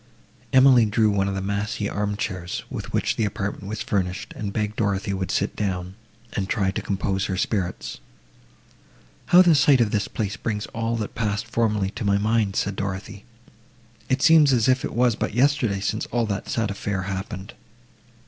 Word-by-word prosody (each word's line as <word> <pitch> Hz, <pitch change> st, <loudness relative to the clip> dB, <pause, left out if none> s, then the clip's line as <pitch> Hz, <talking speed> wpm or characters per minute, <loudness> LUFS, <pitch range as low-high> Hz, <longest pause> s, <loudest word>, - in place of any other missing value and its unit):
Emily 130 Hz, -3 st, +6 dB
drew 105 Hz, 0 st, +2 dB
one 100 Hz, -1 st, +1 dB
of 100 Hz, -, -2 dB
the 95 Hz, -, -3 dB
massy 100 Hz, +1 st, -2 dB
arm 105 Hz, 0 st, -2 dB
chairs, 90 Hz, -4 st, -4 dB
with -, -, -6 dB
which -, -, 0 dB
the -, -, +1 dB
apartment 100 Hz, -1 st, -3 dB
was 110 Hz, +1 st, -4 dB
furnished, 95 Hz, 0 st, -2 dB
and 105 Hz, -2 st, -4 dB
begged 105 Hz, +1 st, -2 dB
Dorothée 100 Hz, -1 st, 0 dB
would 95 Hz, -1 st, -3 dB
sit -, -, -1 dB
down, 95 Hz, -3 st, -3 dB, 0.4 s
and 95 Hz, -2 st, -2 dB
try 100 Hz, -4 st, +1 dB
to -, -, -3 dB
compose 95 Hz, 0 st, -1 dB
her 95 Hz, -, -2 dB
spirits. 95 Hz, -2 st, -2 dB, 1.3 s
"How 180 Hz, +1 st, +8 dB
the 175 Hz, -2 st, +5 dB
sight 140 Hz, -2 st, +5 dB
of 115 Hz, -3 st, +2 dB
this 105 Hz, -2 st, 0 dB
place 100 Hz, -3 st, -3 dB
brings 105 Hz, -2 st, -3 dB
all 115 Hz, +1 st, -1 dB
that 110 Hz, -2 st, -4 dB
passed 105 Hz, -2 st, -1 dB
formerly 105 Hz, -4 st, 0 dB
to 115 Hz, -, -6 dB
my 100 Hz, -1 st, +3 dB
mind!" 105 Hz, -1 st, +1 dB
said 100 Hz, -1 st, -1 dB
Dorothée; 100 Hz, +1 st, -5 dB, 0.8 s
"it 130 Hz, +1 st, +1 dB
seems 160 Hz, -3 st, +6 dB
as 120 Hz, -4 st, +3 dB
if 130 Hz, 0 st, +3 dB
it -, -, -4 dB
was 120 Hz, -1 st, +3 dB
but -, -, -3 dB
yesterday 125 Hz, -6 st, +2 dB
since 105 Hz, +2 st, -2 dB
all 120 Hz, -1 st, 0 dB
that 100 Hz, -2 st, -4 dB
sad 110 Hz, -3 st, 0 dB
affair 100 Hz, -1 st, -3 dB
happened!" 95 Hz, +2 st, -5 dB
105 Hz, 185 wpm, -24 LUFS, 100-115 Hz, 1.3 s, How